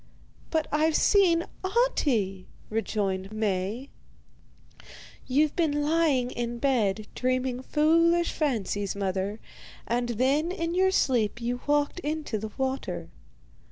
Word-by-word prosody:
'But 320 Hz, -2 st, 0 dB
I've 310 Hz, +1 st, +2 dB
seen 350 Hz, -5 st, +4 dB, 0.2 s
Ahti,' 275 Hz, -, +1 dB, 0.2 s
rejoined 200 Hz, -3 st, -2 dB
Maie. 215 Hz, +4 st, -2 dB, 1.4 s
'You've 290 Hz, +3 st, +2 dB
been 295 Hz, -4 st, +1 dB
lying 295 Hz, -5 st, +2 dB
in 240 Hz, 0 st, -3 dB
bed, 220 Hz, -6 st, +1 dB
dreaming 255 Hz, 0 st, -1 dB
foolish 335 Hz, +4 st, +3 dB
fancies, 205 Hz, -, -1 dB
mother, 195 Hz, +1 st, -2 dB, 0.5 s
and 240 Hz, +1 st, -1 dB
then 270 Hz, +8 st, +1 dB
in 335 Hz, -3 st, -2 dB
your 375 Hz, +1 st, +3 dB
sleep 240 Hz, -, +1 dB
you 245 Hz, +1 st, -3 dB
walked 290 Hz, +3 st, +1 dB
into 305 Hz, -8 st, -3 dB
the 215 Hz, +1 st, -5 dB
water. 260 Hz, -, -3 dB
255 Hz, 110 wpm, -27 LUFS, 215-315 Hz, 1.4 s, seen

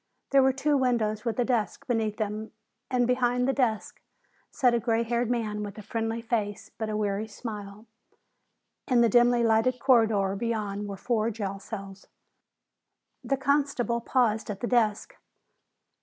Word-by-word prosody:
There 275 Hz, 0 st, +6 dB
were 265 Hz, 0 st, +4 dB
two 285 Hz, +2 st, +1 dB
windows 235 Hz, -4 st, 0 dB
with 230 Hz, -, -1 dB
a 245 Hz, -, +2 dB
desk 235 Hz, -4 st, -1 dB
beneath 225 Hz, -4 st, -1 dB
them, 215 Hz, 0 st, -4 dB, 0.4 s
and 250 Hz, -2 st, +2 dB
behind 250 Hz, 0 st, +1 dB
the 270 Hz, -, +2 dB
desk 235 Hz, -6 st, -1 dB, 0.5 s
sat 250 Hz, -2 st, +2 dB
a 235 Hz, -, +2 dB
gray 230 Hz, 0 st, +1 dB
haired 235 Hz, 0 st, -1 dB
man 220 Hz, -4 st, -1 dB
with 205 Hz, 0 st, -6 dB
a 215 Hz, -, -8 dB
friendly 225 Hz, +1 st, -3 dB
face 215 Hz, -3 st, -2 dB
but 220 Hz, -1 st, -2 dB
a 210 Hz, -, -2 dB
weary 210 Hz, 0 st, -1 dB
smile. 210 Hz, -1 st, -8 dB, 1.0 s
In 250 Hz, -3 st, +4 dB
the 235 Hz, -, +4 dB
dimly 240 Hz, +1 st, +4 dB
lighted 230 Hz, +3 st, +3 dB
corridor 220 Hz, -7 st, +3 dB
beyond 210 Hz, -2 st, -3 dB
were 200 Hz, -1 st, -6 dB
four 225 Hz, +1 st, 0 dB
jail 200 Hz, -3 st, -4 dB
cells. 195 Hz, -1 st, -9 dB, 1.2 s
The 275 Hz, -, 0 dB
constable 270 Hz, -4 st, 0 dB
paused 230 Hz, -4 st, +1 dB
at 200 Hz, -1 st, -5 dB
the -, -, -1 dB
desk. 220 Hz, -4 st, 0 dB
225 Hz, 155 wpm, -27 LUFS, 210-245 Hz, 1.2 s, There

